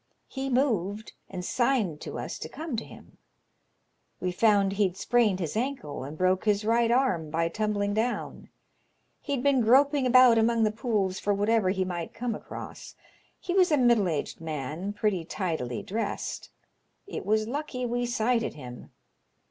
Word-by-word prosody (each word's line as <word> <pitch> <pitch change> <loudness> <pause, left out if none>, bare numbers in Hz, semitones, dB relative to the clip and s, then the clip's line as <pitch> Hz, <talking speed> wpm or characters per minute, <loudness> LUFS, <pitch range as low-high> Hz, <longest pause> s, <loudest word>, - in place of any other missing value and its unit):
He 270 0 -4
moved, 220 -6 0 0.2
and 180 -1 -6
signed 230 - 0
to - - -6
us - - -5
to - - -6
come 310 -5 -5
to 225 - -3
him. - - -15 1.0
We 180 - -1
found 200 0 +3
he'd 195 -2 0
sprained 215 -3 +2
his 165 -2 -3
ankle 230 - -3
and 145 +4 -8
broke 185 +2 +1
his 210 0 +2
right 230 +1 +3
arm 235 - +1
by 165 +2 0
tumbling 205 +1 -1
down. 225 +4 -2 0.7
He'd 275 -4 -2
been 280 -3 +3
groping 270 +4 +4
about 250 -2 +7
among 230 0 +3
the 215 - +3
pools 210 -5 -1
for 205 0 0
whatever 205 -1 +2
he 190 0 0
might 175 -2 -5
come 240 0 -2
across. - - -9 0.4
He 355 - -3
was 365 -2 +4
a 300 - +4
middle 235 -6 +4
aged 155 0 -3
man, 155 +4 -4
pretty 205 -4 -1
tidily 160 - -3
dressed. 215 +1 -4 0.6
It 405 - -6
was 215 +2 +1
lucky 265 -1 -3
we 245 0 -1
sighted 235 -1 0
him. 125 -4 -10
215 Hz, 160 wpm, -27 LUFS, 185-245 Hz, 1.0 s, about